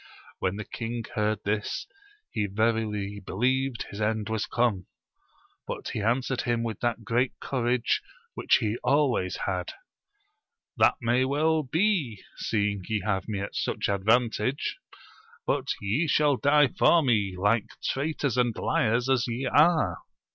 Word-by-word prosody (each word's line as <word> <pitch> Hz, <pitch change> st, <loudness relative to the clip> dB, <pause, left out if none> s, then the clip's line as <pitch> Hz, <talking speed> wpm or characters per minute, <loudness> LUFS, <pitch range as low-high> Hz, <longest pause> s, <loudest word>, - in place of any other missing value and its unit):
When 95 Hz, 0 st, -1 dB
the 105 Hz, 0 st, -5 dB
king 115 Hz, 0 st, -4 dB
heard 105 Hz, 0 st, 0 dB
this, 105 Hz, +1 st, -2 dB, 0.5 s
he 105 Hz, -1 st, -1 dB
verily 105 Hz, -1 st, -1 dB
believed 125 Hz, +6 st, 0 dB
his 100 Hz, -, -6 dB
end 110 Hz, 0 st, 0 dB
was 110 Hz, +1 st, -1 dB
come 120 Hz, -5 st, +1 dB
j 90 Hz, -, -16 dB, 0.8 s
but -, -, -5 dB
he 110 Hz, -, -3 dB
answered 125 Hz, +4 st, 0 dB
him 120 Hz, -1 st, 0 dB
with 115 Hz, -2 st, -4 dB
that 120 Hz, -1 st, -1 dB
great 120 Hz, +4 st, 0 dB
courage 125 Hz, -2 st, 0 dB, 0.3 s
which -, -, +3 dB
he 110 Hz, +1 st, -1 dB
always 130 Hz, -11 st, +2 dB
had: 90 Hz, -2 st, -2 dB, 1.0 s
That -, -, +4 dB
may 120 Hz, +2 st, +2 dB
well 155 Hz, +4 st, +2 dB
be, 155 Hz, -, 0 dB
seeing 100 Hz, -2 st, -1 dB
ye 110 Hz, -3 st, -1 dB
have 95 Hz, -3 st, -1 dB
me 105 Hz, -3 st, -3 dB
at 100 Hz, -, -5 dB
such -, -, -1 dB
advantage; 110 Hz, +5 st, +1 dB, 0.7 s
but 140 Hz, -1 st, 0 dB
ye 110 Hz, +12 st, 0 dB
shall 145 Hz, -1 st, +3 dB
die 145 Hz, +1 st, +4 dB
for 170 Hz, -2 st, +4 dB
me, 105 Hz, -7 st, +1 dB
like 105 Hz, +3 st, +2 dB, 0.2 s
traitors 140 Hz, -2 st, -1 dB
and 120 Hz, -3 st, +2 dB
liars 115 Hz, +3 st, +1 dB
as 130 Hz, -3 st, +2 dB
ye 120 Hz, +3 st, -3 dB
are 155 Hz, -, +3 dB
115 Hz, 145 wpm, -27 LUFS, 105-130 Hz, 1.0 s, That